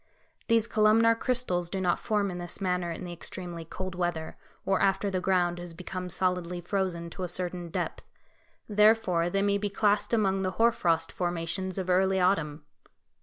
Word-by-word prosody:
These 230 Hz, -1 st, +3 dB
columnar 225 Hz, +1 st, +4 dB
crystals 230 Hz, -8 st, -1 dB
do 195 Hz, -, -3 dB
not 180 Hz, -2 st, +1 dB
form 205 Hz, -3 st, 0 dB
in 175 Hz, -, -5 dB
this 175 Hz, -1 st, -5 dB
manner 180 Hz, -2 st, 0 dB
in 165 Hz, -, -6 dB
the 175 Hz, -1 st, -6 dB
extremely 175 Hz, 0 st, -6 dB
cold 185 Hz, +3 st, -6 dB
weather, 175 Hz, -3 st, -2 dB, 0.3 s
or 195 Hz, -1 st, +1 dB
after 195 Hz, +1 st, +2 dB
the 185 Hz, -1 st, -1 dB
ground 175 Hz, -2 st, +1 dB
has 175 Hz, -1 st, -8 dB
become 180 Hz, +1 st, -5 dB
solidly 180 Hz, -1 st, -1 dB
frozen 175 Hz, -2 st, -2 dB
to 185 Hz, -, -8 dB
a 180 Hz, -, -3 dB
certain 175 Hz, -1 st, -2 dB
depth; -, -, -3 dB, 0.6 s
therefore 210 Hz, -5 st, +3 dB
they 195 Hz, +2 st, 0 dB
may 200 Hz, 0 st, +2 dB
be 205 Hz, 0 st, -1 dB
classed 205 Hz, +1 st, +1 dB
among 195 Hz, -4 st, +2 dB
the 185 Hz, -1 st, -1 dB
hoar 230 Hz, +1 st, +5 dB
frost 165 Hz, -6 st, 0 dB
formations 175 Hz, +2 st, -2 dB
of 185 Hz, -2 st, -3 dB
early 190 Hz, +1 st, +3 dB
autumn. 160 Hz, -5 st, +1 dB
185 Hz, 175 wpm, -28 LUFS, 175-200 Hz, 0.6 s, hoar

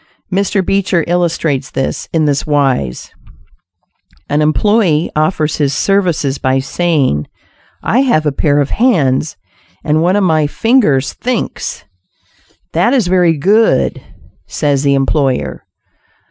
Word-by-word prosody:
Mr. 195 Hz, 0 st, 0 dB
Beecher 195 Hz, -3 st, +1 dB
illustrates 165 Hz, -5 st, -1 dB
this, 135 Hz, -, -3 dB
in 160 Hz, -2 st, +1 dB
this 145 Hz, -1 st, 0 dB
wise: 135 Hz, -, -1 dB, 1.2 s
An 145 Hz, +1 st, +1 dB
employee 170 Hz, +1 st, +1 dB
offers 155 Hz, 0 st, 0 dB
his 140 Hz, -2 st, 0 dB
services 170 Hz, -7 st, 0 dB
by 130 Hz, 0 st, +1 dB
saving, 135 Hz, -, 0 dB, 0.6 s
"I 235 Hz, -, +1 dB
have 240 Hz, -, +2 dB
a 150 Hz, -, +1 dB
pair 145 Hz, +1 st, 0 dB
of 145 Hz, -, -1 dB
hands 155 Hz, -, +1 dB, 0.5 s
and 155 Hz, +1 st, +1 dB
one 180 Hz, +3 st, +2 dB
of 205 Hz, -, +2 dB
my 155 Hz, -4 st, +2 dB
fingers 150 Hz, -, +1 dB
thinks." 250 Hz, -3 st, -4 dB, 0.9 s
"That 185 Hz, +11 st, +2 dB
is 240 Hz, -7 st, +2 dB
very 175 Hz, -3 st, +2 dB
good," 210 Hz, +9 st, +2 dB, 0.5 s
says 145 Hz, -3 st, -1 dB
the 140 Hz, -1 st, +2 dB
employer. 135 Hz, -1 st, -1 dB
155 Hz, 120 wpm, -14 LUFS, 140-190 Hz, 1.2 s, have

